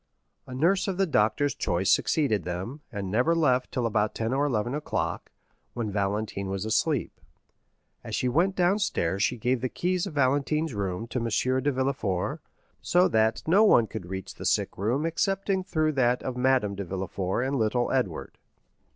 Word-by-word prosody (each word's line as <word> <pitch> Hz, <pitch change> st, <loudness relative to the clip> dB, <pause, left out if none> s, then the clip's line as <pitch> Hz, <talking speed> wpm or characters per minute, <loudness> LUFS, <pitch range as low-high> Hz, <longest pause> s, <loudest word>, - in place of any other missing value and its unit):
A 125 Hz, -, -7 dB
nurse 175 Hz, +10 st, +2 dB
of 190 Hz, -2 st, -2 dB
the 195 Hz, -, +3 dB
doctor's 145 Hz, -, +1 dB
choice 90 Hz, +2 st, 0 dB
succeeded 135 Hz, -, +2 dB
them, 95 Hz, -, -5 dB
and 100 Hz, -4 st, -4 dB
never 125 Hz, +10 st, +2 dB
left 130 Hz, -6 st, +2 dB
till 125 Hz, -, -1 dB
about 105 Hz, -2 st, 0 dB
ten 115 Hz, +2 st, -1 dB
or 140 Hz, +2 st, +1 dB
eleven 120 Hz, -1 st, -1 dB
o'clock, 150 Hz, +1 st, -3 dB, 0.4 s
when 115 Hz, -4 st, -2 dB
Valentine 100 Hz, 0 st, -2 dB
was 95 Hz, +1 st, -3 dB
asleep. 110 Hz, -, 0 dB, 0.8 s
As -, -, -4 dB
she 125 Hz, -, 0 dB
went 170 Hz, +9 st, +2 dB
downstairs 175 Hz, -, +1 dB
she 125 Hz, -, +1 dB
gave 125 Hz, +2 st, 0 dB
the 130 Hz, -, -1 dB
keys 180 Hz, +4 st, -1 dB
of 150 Hz, -, -8 dB
Valentine's 145 Hz, +3 st, +1 dB
room 100 Hz, 0 st, -3 dB
to 125 Hz, -, -2 dB
M. 115 Hz, 0 st, -2 dB, 0.3 s
de 145 Hz, -, +1 dB
Villefort, 130 Hz, -9 st, -1 dB, 0.4 s
so 180 Hz, +1 st, +3 dB
that 110 Hz, 0 st, +1 dB
no 190 Hz, +7 st, +5 dB
one 120 Hz, -, +5 dB
could 110 Hz, -5 st, -7 dB
reach 95 Hz, 0 st, -6 dB
the -, -, -10 dB
sick -, -, 0 dB
room 120 Hz, -, 0 dB
excepting 195 Hz, +3 st, 0 dB
through 155 Hz, -4 st, 0 dB
that 125 Hz, -3 st, +1 dB
of 130 Hz, -, -3 dB
Madame 125 Hz, -5 st, +2 dB
de 100 Hz, 0 st, -4 dB
Villefort 95 Hz, +3 st, -3 dB
and 135 Hz, +1 st, -1 dB
little 120 Hz, +2 st, +1 dB
Edward. 100 Hz, -12 st, -2 dB
125 Hz, 175 wpm, -27 LUFS, 105-150 Hz, 0.8 s, no